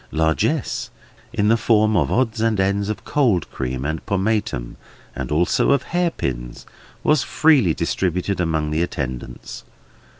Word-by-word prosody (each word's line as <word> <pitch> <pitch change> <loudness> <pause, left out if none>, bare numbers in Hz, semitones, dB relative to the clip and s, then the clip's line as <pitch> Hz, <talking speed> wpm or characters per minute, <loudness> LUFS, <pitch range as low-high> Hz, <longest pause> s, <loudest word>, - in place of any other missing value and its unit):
Largess, 80 0 0 0.4
in 105 +1 +1
the 115 - +5
form 110 -1 +3
of 75 -7 +2
odds 115 -3 +1
and 110 -2 +1
ends 100 +1 +1
of 110 - -4
cold 115 - +2
cream 65 0 -3
and 80 +2 -3
pomatum, 100 - -1 0.4
and 65 +1 -5
also 85 - +3
of 140 - +1
hairpins, 65 - -2 0.4
was 150 -2 +3
freely 135 - +3
distributed 90 +2 -1
among 80 -3 0
the 80 +2 0
attendants. 65 -7 -5
95 Hz, 135 wpm, -21 LUFS, 75-110 Hz, 0.4 s, the